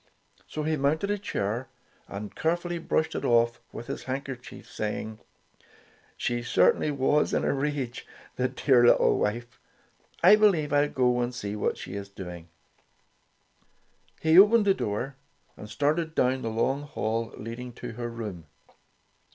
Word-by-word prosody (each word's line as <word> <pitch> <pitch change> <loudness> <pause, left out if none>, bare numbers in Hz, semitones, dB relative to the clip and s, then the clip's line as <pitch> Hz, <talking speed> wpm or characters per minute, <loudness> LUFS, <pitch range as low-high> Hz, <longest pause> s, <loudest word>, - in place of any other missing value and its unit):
So 155 - -4
he 155 0 0
mounted 155 +8 +1
a 205 - -1
chair, 120 - -3 0.4
and 100 +1 -7
carefully 175 +1 -1
brushed 160 -1 0
it - - -4
off 120 0 +2
with 120 - -8
his - - -6
handkerchief, 130 -1 -6
saying: 110 +1 -4 1.0
''She 120 0 -1
certainly 120 - +3
was 145 +1 +1
in - - +1
a - - +2
rage, 140 -3 -3 0.3
the 130 - +1
dear 130 -1 +3
little 120 - +5
wife. 120 +3 -3 0.6
I 200 +4 +8
believe 175 -9 +3
I'll 145 0 +3
go 125 -1 +2
and 120 0 -2
see 105 -3 -4
what 105 - -1
she - - -8
is 100 0 -6
doing." 90 -4 -9 1.7
He 160 +3 +6
opened 210 +2 +6
the 195 - +5
door 125 - -3 0.4
and 105 - -10
started 155 +7 0
down 130 +1 +2
the 115 - -2
long 130 +5 0
hall 115 -6 -3
leading 120 +3 -7
to - - -7
her 120 +1 -5
room. 105 -8 -7
125 Hz, 150 wpm, -27 LUFS, 115-150 Hz, 1.7 s, I